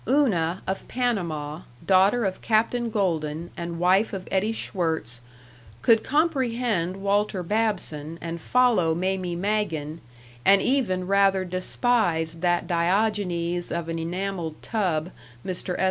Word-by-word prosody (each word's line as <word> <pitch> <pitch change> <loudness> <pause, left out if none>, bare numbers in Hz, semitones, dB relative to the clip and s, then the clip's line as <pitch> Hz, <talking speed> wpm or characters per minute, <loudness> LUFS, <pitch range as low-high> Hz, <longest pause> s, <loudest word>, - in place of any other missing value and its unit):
Una, 190 - +2
of 190 - -4
Panama, 170 -11 -2 0.2
daughter 195 +5 +4
of 190 -1 -3
Captain 230 +2 +1
Golden, 170 -6 -1
and 170 -1 -5
wife 185 +6 +3
of 190 -2 -5
Eddie 200 +3 +1
Schwirtz, 160 - -2 0.6
could 225 -1 +5
comprehend 245 - 0
Walter 200 -1 0
Babson 175 -7 -2
and 170 0 -5
follow 225 -8 +3
Mamie 185 0 -1
Magen, 170 -6 -2 0.4
and 195 +5 +6
even 195 -8 +1
rather 195 0 +3
despised 175 -3 0
that 175 -1 +1
Diogenes 175 -1 0
of 170 -1 -3
an 165 0 -2
enameled 175 -1 -3
tub, 180 -6 -1 0.3
Mr. 180 0 -3
S. - - -6
185 Hz, 120 wpm, -25 LUFS, 170-215 Hz, 0.6 s, and